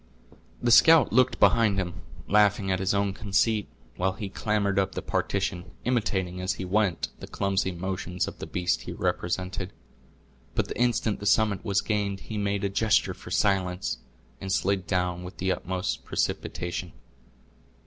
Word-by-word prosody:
The 120 - +3
scout 160 +5 +7
looked 130 +1 +3
behind 110 -4 +4
him, 90 -2 -3 0.3
laughing 105 -1 +3
at 95 - +1
his 95 0 +1
own 100 -1 +1
conceit, 105 +1 +1 0.3
while 95 +1 +1
he 95 +1 -6
clambered 100 -1 0
up 95 0 -1
the - - -2
partition, 95 -2 -1 0.2
imitating, 95 -7 0
as 95 +1 0
he 95 - -5
went, 95 -2 +1
the - - -8
clumsy 95 -1 0
motions 90 0 -3
of - - -8
the - - -6
beast 90 -1 0
he - - -6
represented; 90 +1 -2 0.8
but - - +1
the - - -3
instant 115 -3 +1
the 105 - -3
summit 105 -3 +3
was 100 -2 +1
gained 100 -2 -1
he 110 - -6
made 100 0 -1
a - - +2
gesture 105 +2 +2
for - - -12
silence, 90 - 0 0.4
and 95 - -4
slid 95 -1 0
down 90 -1 -1
with 90 - -9
the 95 +1 0
utmost 95 0 -2
precipitation. 85 0 -3
95 Hz, 160 wpm, -27 LUFS, 90-105 Hz, 0.8 s, scout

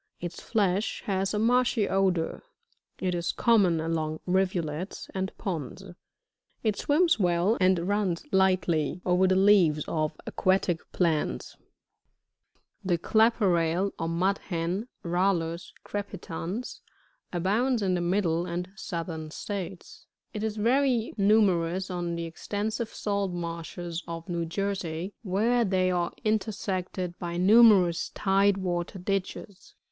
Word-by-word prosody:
Its 175 0 -6
flesh 205 -2 0
has 195 -1 0
a 210 - -1
marshy 230 -1 +2
odour. 185 -4 0 0.6
It 185 -1 -1
is 170 -1 -1
common 200 -8 +3
along 155 -1 -2
rivulets, 180 -2 -1
and 190 0 -2
ponds; 175 - -4 0.8
it 215 -3 +1
swims 320 - +2
well 180 +3 +2
and 185 -2 +3
runs 200 -4 0
lightly 185 -4 +2
over 180 +1 +3
the 185 - +3
leaves 185 -6 +4
of 155 -1 -2
aquatic 185 -3 +1
plants. 155 - 0
60. - - -35 1.2
[The 180 -2 +1
Clapper 220 +3 +3
Rail, 170 +2 +1
or 165 - -1
MvdHen, 180 +2 -1
— - - -49
Rallus 175 -1 0
crepitans, 200 +1 -5 0.2
— - - -41
abounds 210 +7 +1
in 185 -1 +1
the 180 - 0
Middle 175 -1 0
and 175 +1 -4
Southern 165 -4 -5
States. 190 +1 -7 0.3
It 215 -1 -4
is 220 -1 -2
very 245 +1 +2
numerous* 190 -4 +2
on 175 -1 -2
the 170 0 -3
extensive 210 +6 -3
salt 200 -3 -2
marshes 170 0 -5
of 165 -1 -6
New 170 -2 -2
Jersey, 190 -1 -3
where 225 +5 +1
they 185 -3 +1
are 175 -1 0
intersected 190 -4 -2
by 170 -1 -4
numerous 195 -3 +5
tide 195 0 +3
water 175 0 -3
ditches. 195 +1 -4
185 Hz, 125 wpm, -27 LUFS, 170-205 Hz, 1.2 s, numerous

